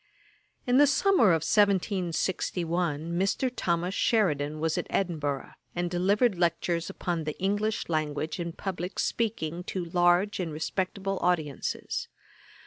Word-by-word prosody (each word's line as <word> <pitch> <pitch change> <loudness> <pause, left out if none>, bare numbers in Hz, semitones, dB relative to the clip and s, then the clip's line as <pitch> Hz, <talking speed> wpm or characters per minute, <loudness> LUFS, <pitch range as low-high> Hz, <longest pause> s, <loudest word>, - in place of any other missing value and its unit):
In 250 +1 +4
the 290 - +7
summer 280 - +4
of 165 -4 +3
1761 175 -4 0
Mr. 195 +8 0
Thomas 175 0 0
Sheridan 155 -10 +1
was 160 0 0
at - - -2
Edinburgh, 150 -7 -1 0.2
and 175 0 -1
delivered 195 +3 +2
lectures 170 0 0
upon 170 -3 -3
the 150 - -4
English 205 +3 0
Language 155 0 -2
and 170 -1 -4
Publick 185 -1 -4
Speaking 180 -7 -1
to 185 -3 -3
large 175 +4 +2
and 170 -3 -2
respectable 190 +5 -2
audiences. 160 -6 -1
175 Hz, 125 wpm, -28 LUFS, 165-195 Hz, 0.2 s, the